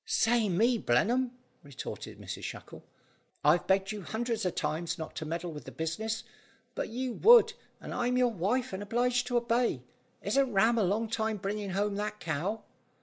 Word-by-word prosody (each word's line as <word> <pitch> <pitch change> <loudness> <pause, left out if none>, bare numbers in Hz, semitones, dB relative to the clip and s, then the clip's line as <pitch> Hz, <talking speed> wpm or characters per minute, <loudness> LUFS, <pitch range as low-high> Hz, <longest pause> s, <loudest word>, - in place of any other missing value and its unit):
"Say 225 -2 +2
me, 230 +7 +3
Blenheim," 240 - +2 0.3
retorted 140 -3 -8
Mrs - - -6
Shackle. - - -8 0.6
"I've 155 +4 +4
begged 195 +1 +2
you 210 -1 -5
hundreds 225 +2 -2
of 180 - -1
times 165 +2 -2
not 160 - -7
to 160 - -4
meddle 170 +2 -3
with 150 -1 -9
the - - -8
business, 220 +8 -3 0.5
but - - -3
you 250 +2 -3
would, 470 - +7 0.3
and - - -7
I'm 250 +1 0
your 250 -1 +3
wife 225 +5 -1
and 190 - -4
obliged 245 +3 +1
to 245 - +1
obey. 235 +1 +1 0.4
Isn't 275 -2 +2
Ram 225 +4 +4
a - - +3
long 210 +5 +1
time 220 -1 -1
bringing 205 +1 -3
home 200 +2 0
that 210 0 -3
cow?" 175 +7 -2
215 Hz, 175 wpm, -30 LUFS, 190-240 Hz, 0.6 s, would